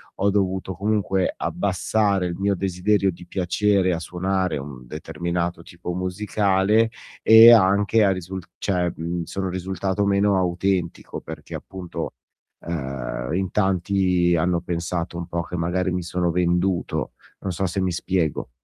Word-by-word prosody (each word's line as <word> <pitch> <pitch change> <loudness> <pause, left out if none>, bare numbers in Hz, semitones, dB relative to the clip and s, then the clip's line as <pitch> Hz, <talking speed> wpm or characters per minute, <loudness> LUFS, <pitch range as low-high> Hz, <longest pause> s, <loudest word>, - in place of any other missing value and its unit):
ho 100 - +1
dovuto 95 -1 0
comunque 95 -1 0
abbassare 100 0 0
il 85 - -4
mio 100 +1 +1
desiderio 95 +2 +1
di 90 +1 -12
piacere 95 +1 +1
a 85 - -2
suonare 90 +1 -1
un 70 -3 -8
determinato 85 +3 -3
tipo 90 +1 -7
musicale, 100 +3 +1 0.3
e 110 +1 +9
anche 105 +1 +5
a 100 - +4
risul 95 0 -4 0.2
cioè 90 -3 0 0.3
sono 95 +3 -3
risultato 95 +2 -2
meno 100 0 +3
autentico, 90 0 -1
perché - - -8
appunto, 95 -3 -6 0.5
ehm, 65 -5 -4
in 95 +1 -1
tanti 90 -2 +2
hanno 85 +1 +1
pensato 85 0 -3
un 85 - -5
po' 85 0 -2
che 90 - -7
magari 90 +2 0
mi 90 0 -2
sono 85 0 -1
venduto. 90 +1 0 0.3
Non 95 - -3
so 95 +3 -1
se 95 +2 -2
mi 95 - 0
spiego. 85 -2 -1
90 Hz, 140 wpm, -23 LUFS, 85-95 Hz, 0.5 s, e